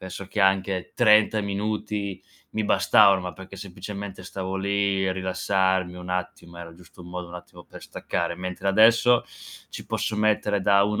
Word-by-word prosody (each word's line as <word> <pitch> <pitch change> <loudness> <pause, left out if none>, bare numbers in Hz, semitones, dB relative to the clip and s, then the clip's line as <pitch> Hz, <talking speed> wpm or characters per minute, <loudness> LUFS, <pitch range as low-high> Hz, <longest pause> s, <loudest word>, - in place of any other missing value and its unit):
Adesso 95 +1 -8
che 105 - -3
anche 95 -1 +1
30 110 -1 +4
minuti 100 -1 -3 0.3
mi 110 - -2
bastavano, 100 -1 +5
ma 90 0 -6
perché 95 +1 -12
semplicemente 100 0 -8
stavo 95 0 -5
lì 100 0 0
a - - 0
rilassarmi 95 0 0
un 90 0 -9
attimo, 90 -1 -5
era 85 -1 -9
giusto 90 +1 -16
un 85 - -12
modo 90 0 -6
un 85 - -11
attimo 90 0 -12
per - - -13
staccare, 85 0 -4
mentre 90 +2 -4
adesso 115 +4 +5 0.5
ci - - -8
posso 110 - -2
mettere 105 -1 +1
da 100 +1 +4
1 105 +1 -1
95 Hz, 170 wpm, -24 LUFS, 90-100 Hz, 0.5 s, bastavano